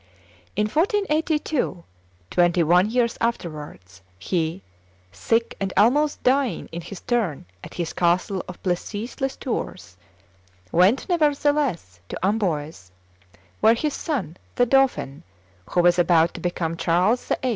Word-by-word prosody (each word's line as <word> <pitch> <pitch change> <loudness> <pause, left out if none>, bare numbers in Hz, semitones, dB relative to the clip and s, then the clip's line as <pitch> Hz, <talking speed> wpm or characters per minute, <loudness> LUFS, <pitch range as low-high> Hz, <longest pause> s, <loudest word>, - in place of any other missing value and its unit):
In 210 - +1
1482, 310 - 0 0.5
twenty 175 -1 +3
one 180 +5 +4
years 235 0 0
afterwards, 150 - -4 0.2
he, 165 - -2 0.5
sick 225 - 0
and 195 -1 -2
almost 285 +8 +3
dying 260 -1 +1
in 170 - -5
his 195 +3 -9
turn 210 - -1 0.2
at - - -10
his 170 -2 -3
castle 180 +2 +1
of 180 - -9
Plessis 205 +8 -3
les 270 0 -1
Tours, 185 - -5 0.7
went, 190 +9 +3
nevertheless, 290 - 0
to - - -5
Amboise, 160 - -2 0.7
where 220 +2 +5
his 295 +4 -1
son 190 - -3 0.2
the 245 - +3
dauphin, 255 - +1 0.5
who 175 - +2
was 175 0 +4
about 170 -1 +4
to - - -8
become 170 -2 -2
Charles 180 +10 +1 0.2
VIII. 260 - +1
195 Hz, 125 wpm, -23 LUFS, 170-255 Hz, 0.7 s, where